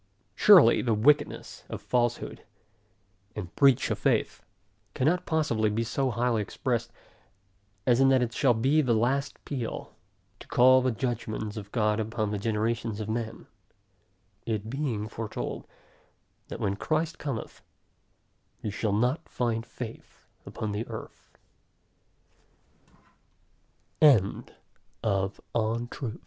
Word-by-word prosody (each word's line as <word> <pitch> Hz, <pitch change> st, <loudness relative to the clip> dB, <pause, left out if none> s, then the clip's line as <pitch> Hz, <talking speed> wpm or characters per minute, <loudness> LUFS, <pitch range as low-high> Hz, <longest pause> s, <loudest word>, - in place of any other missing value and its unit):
Surely 180 Hz, -, +7 dB
the 115 Hz, -3 st, +1 dB
wickedness 145 Hz, +7 st, +1 dB
of -, -, -5 dB
falsehood, 120 Hz, -2 st, -1 dB, 0.9 s
and 90 Hz, -5 st, -6 dB
breach 135 Hz, -3 st, +4 dB
of -, -, -1 dB
faith, -, -, 0 dB, 0.5 s
cannot 170 Hz, +7 st, +1 dB
possibly 120 Hz, -9 st, +1 dB
be 110 Hz, +2 st, -1 dB
so 130 Hz, +4 st, -1 dB
highly 120 Hz, -1 st, 0 dB
expressed, 120 Hz, +2 st, -2 dB, 0.9 s
as 125 Hz, -1 st, +4 dB
in 135 Hz, 0 st, +5 dB
that 130 Hz, -2 st, +4 dB
it 115 Hz, -1 st, -3 dB
shall 125 Hz, -3 st, +3 dB
be 135 Hz, +7 st, +3 dB
the 125 Hz, -5 st, +2 dB
last 135 Hz, +5 st, 0 dB
peal, 125 Hz, -6 st, -5 dB, 0.5 s
to -, -, -13 dB
call 130 Hz, +1 st, +6 dB
the 130 Hz, -, +1 dB
judgments 110 Hz, -3 st, -3 dB
of 100 Hz, -2 st, -8 dB
God 105 Hz, -2 st, +1 dB
upon 110 Hz, -1 st, -2 dB
the 105 Hz, -, -2 dB
generations 110 Hz, 0 st, -1 dB
of 110 Hz, 0 st, -4 dB
men; 110 Hz, 0 st, -4 dB, 1.0 s
it 110 Hz, -1 st, -2 dB
being 125 Hz, -7 st, -2 dB
foretold, 115 Hz, -1 st, -5 dB, 0.8 s
that -, -, -7 dB
when 100 Hz, 0 st, 0 dB
Christ 155 Hz, +8 st, -1 dB
cometh, 135 Hz, -6 st, -5 dB, 1.0 s
he 105 Hz, -, -4 dB
shall 105 Hz, +1 st, -1 dB
not 125 Hz, +10 st, 0 dB
find 115 Hz, -2 st, -1 dB
faith 115 Hz, -1 st, -10 dB, 0.2 s
upon 110 Hz, -, -4 dB
the 105 Hz, +3 st, -3 dB
earth. -, -, -10 dB
115 Hz, 115 wpm, -28 LUFS, 110-130 Hz, 1.0 s, Surely